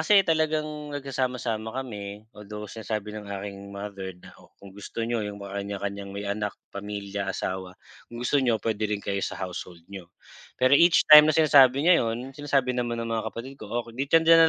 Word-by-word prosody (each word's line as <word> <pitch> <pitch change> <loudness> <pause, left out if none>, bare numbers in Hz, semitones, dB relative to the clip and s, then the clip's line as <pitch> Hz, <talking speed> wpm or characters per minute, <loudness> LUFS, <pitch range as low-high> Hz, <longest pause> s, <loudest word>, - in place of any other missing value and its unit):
kasi 195 +4 +5
talagang 155 -1 +2 0.3
nagsasama-sama 125 -5 -2
kami 105 -5 -6
although 105 0 -8
sinasabi 105 0 -5
ng 105 -1 -8
aking 100 0 -6
mother 100 -1 -6
na, - - -15
"O - - -19
kung 100 -1 -13
gusto 105 +3 -5
niyo 115 -1 -1
yung 105 0 -5
mga 100 0 -5
kanya-kanyang 100 0 -5
may 100 +1 -6
anak, 105 +1 -3 0.2
pamilya, 100 -1 -5
asawa 95 -1 -4 0.3
kung 120 +1 -7
gusto 140 +2 +3
niyo 120 -4 +2
pwede 110 -1 0
rin 105 -1 -1
kayo 100 0 -1
sa - - -3
household 90 -2 -7
niyo," 90 -3 -8 0.5
pero 130 +2 +3
each 170 +3 +6
time 150 0 +10
na 155 - +2
sinasabi 140 -3 +6
niya 175 -1 +6
'yun 120 +3 -3
sinasabi 135 -3 0
naman 120 -1 -2
ng 115 - -3
mga 110 -1 -1
kapatid 130 +4 -8
ko 105 - -8
"O 120 0 -1
kung 115 - -11
dito, 140 +4 +3
diyan 165 0 +7
110 Hz, 195 wpm, -26 LUFS, 100-135 Hz, 0.5 s, time